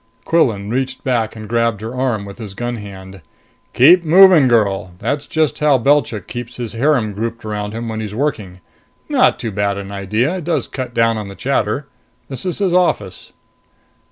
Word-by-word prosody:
Quillan 110 -11 +1
reached 130 +1 -2
back 115 -4 -1
and 110 -1 -8
grabbed 115 -2 0
her 110 +2 -6
arm 125 -5 -1
with 100 +3 -11
his 105 -4 -8
gun 120 +2 -3
hand. 95 -2 -10 0.5
"Keep 170 +8 +6
moving, 175 -3 +7
girl! 100 -6 +1
That's 145 +8 -3
just 155 -5 0
how 150 -2 +4
Belchik 130 -6 +1
keeps 120 0 -7
his 120 -4 -5
harem 120 -3 +1
grouped 115 +2 -5
around 105 -1 -4
him 115 +1 -5
when 110 -1 -4
he's 105 -1 -5
working. 105 -9 -3 0.5
Not - - +3
too 115 - -4
bad 100 0 -1
an 100 0 -7
idea 110 - -1
it 180 - -6
does 165 +1 -1
cut 130 -3 -6
down 115 -3 +1
the 100 - -9
chatter. 135 +1 -1 0.4
This 135 +7 -5
is 180 - -2
his 195 -3 0
office." 105 - 0
115 Hz, 180 wpm, -18 LUFS, 105-140 Hz, 0.5 s, moving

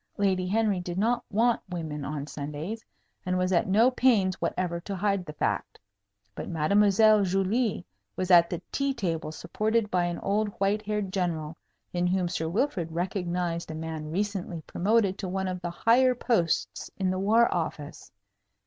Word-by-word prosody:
Lady 190 -2 +1
Henry 210 -1 +1
did 175 0 -5
not 235 +4 +1
want 230 +3 +2
women 160 -5 -4
on 145 0 -4
Sundays, 150 +9 -6 0.4
and 185 -1 -1
was 185 +1 +1
at 170 - +2
no 220 +7 +4
pains 220 -8 +2
whatever 170 0 -1
to 195 +3 -5
hide 195 -1 0
the 150 - -8
fact. - - -2 0.5
But - - -6
Mademoiselle 205 +6 +4
Julie 195 +2 0 0.3
was 185 0 -1
at 170 -1 +7
the 175 0 -4
tea 275 -1 0
table, 170 -8 -2
supported 215 +6 -1
by 180 -1 +2
an 175 -1 -2
old 210 +2 0
white 200 +2 +1
haired 210 -2 -3
general, 165 -4 -2 0.4
in 175 0 +1
whom 180 0 +1
Sir 160 -2 -2
Wilfrid 180 - -1
recognized 175 -1 -2
a 160 - -5
man 160 -1 -5
recently 185 -2 -3
promoted 200 +2 +1
to 190 - -3
one 190 +1 -2
of 180 -1 -4
the 175 - -3
higher 250 +8 +3
posts 220 -9 0
in 190 -1 0
the 185 - -2
War 225 +4 +4
Office. 160 -2 -5
185 Hz, 165 wpm, -27 LUFS, 170-210 Hz, 0.5 s, at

